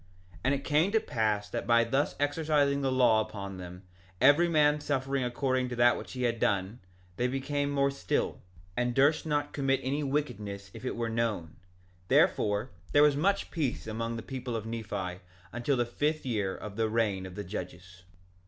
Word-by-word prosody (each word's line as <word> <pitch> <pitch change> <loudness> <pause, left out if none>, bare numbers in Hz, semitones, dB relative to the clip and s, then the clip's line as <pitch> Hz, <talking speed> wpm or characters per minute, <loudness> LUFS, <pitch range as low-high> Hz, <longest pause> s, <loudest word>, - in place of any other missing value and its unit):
1:33 - - -19
And 135 - +3
it 140 - -5
came 155 +7 +2
to 220 - +5
pass 110 - -1
that - - -4
by 115 0 +5
thus 135 +5 0
exercising 145 -1 +1
the 135 -1 +1
law 125 -4 +4
upon 100 -3 -6
them, 90 +1 -9 0.4
every 145 +6 +6
man 150 -2 +4
suffering 135 -2 -1
according 130 +1 0
to 125 - -4
that 120 0 +5
which - - -8
he 125 -1 -3
had 115 -1 0
done, 100 +3 0 0.4
they 125 - +1
became 140 +2 -1
more 140 -1 +2
still, 115 -10 -2 0.3
and 120 0 0
durst 145 +4 +3
not 145 -1 -1
commit 135 -1 +1
any 140 +3 -1
wickedness 110 -9 -3
if - - -10
it 130 - -2
were 115 0 -2
known; 110 -9 -2 0.5
therefore, 105 +6 +2 0.2
there 145 - +7
was 150 -1 +5
much 195 +7 +1
peace 150 -7 -2
among 115 +1 -3
the 115 - -5
people 125 -2 -5
of 110 -1 -3
Nephi 100 -5 -4 0.3
until 120 +3 0
the 120 - +2
fifth 150 +6 -1
year 105 -6 -1
of 105 -1 -8
the 110 -1 +1
reign 105 -4 0
of 90 - -11
the 105 - -4
judges. 90 -2 -8
120 Hz, 190 wpm, -30 LUFS, 105-140 Hz, 0.5 s, there